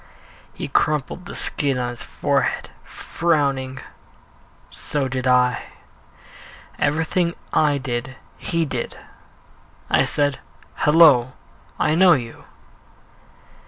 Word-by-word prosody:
He - - -5
crumpled 150 +4 -1
the - - -8
skin 140 -3 0
on 125 -1 -2
his 120 -1 -7
forehead, - - -1
frowning 140 -6 -1 0.9
so 145 -3 -2
did 130 0 -3
I. 125 -1 +3 1.2
Everything 160 +3 0 0.2
I 150 -2 +3
did 125 -1 -4 0.2
he 165 -1 -1
did. 125 -5 -5 0.9
I - - +4
said, 145 -2 0 0.3
"Hello, 150 -6 +5 0.5
I 155 - +2
know 180 +2 +6
you." 120 -6 -4
140 Hz, 95 wpm, -21 LUFS, 130-155 Hz, 1.2 s, know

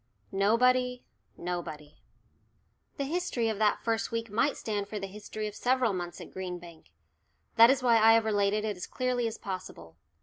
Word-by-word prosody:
"NOBODY 250 +5 +2 0.3
NOBODY." 170 -4 -6 1.0
The 280 - -1
history 280 -6 -1
of 215 -2 -3
that 215 -1 +2
first 225 -1 -1
week 230 -1 -3
might 230 +7 +1
stand 205 -2 -3
for 210 - -5
the 195 - -4
history 210 +2 -6
of 210 - -6
several 250 -1 +1
months 175 -1 -5
at - - -10
Green 185 -1 -5
Bank. 170 -2 -14 0.7
That 230 0 +8
is 265 -1 +2
why 235 -2 +5
I 225 +1 +7
have 225 -1 +3
related 210 0 +1
it 210 -2 -2
as 180 - -7
clearly 250 -2 -1
as 225 - -5
possible. 85 - -7
215 Hz, 175 wpm, -29 LUFS, 190-240 Hz, 1.0 s, That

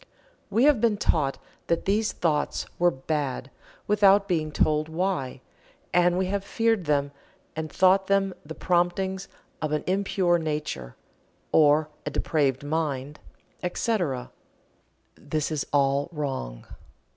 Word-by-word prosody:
We 220 +4 +2
have 285 -6 +5
been 225 -3 +3
taught 150 -8 +1 0.3
that 170 - 0
these 210 +2 +1
thoughts 150 -4 -1
were 175 0 +5
"bad" 135 -3 -3 0.3
without 200 -1 +4
being 160 -5 0
told 155 +1 +1
why, 160 -7 -2 0.5
and 175 0 +4
we 190 - +1
have 195 +1 -2
feared 225 -3 0
them 145 -1 +1 0.4
and 155 -1 -4
thought 190 +1 +4
them 195 -1 +2
the 160 +2 -8
promptings 190 +2 0 0.3
of 155 -1 -2
an 150 - 0
impure 185 -2 +1
nature, 150 - -4 0.6
or 150 0 +5 0.2
a - - -3
depraved 140 -2 0
mind, 145 -2 -2 0.4
etc. 180 - -1 0.8
This 155 +1 -3
is 150 -3 -2
all 140 +1 +2
wrong. 135 - -4
160 Hz, 125 wpm, -26 LUFS, 145-190 Hz, 0.8 s, have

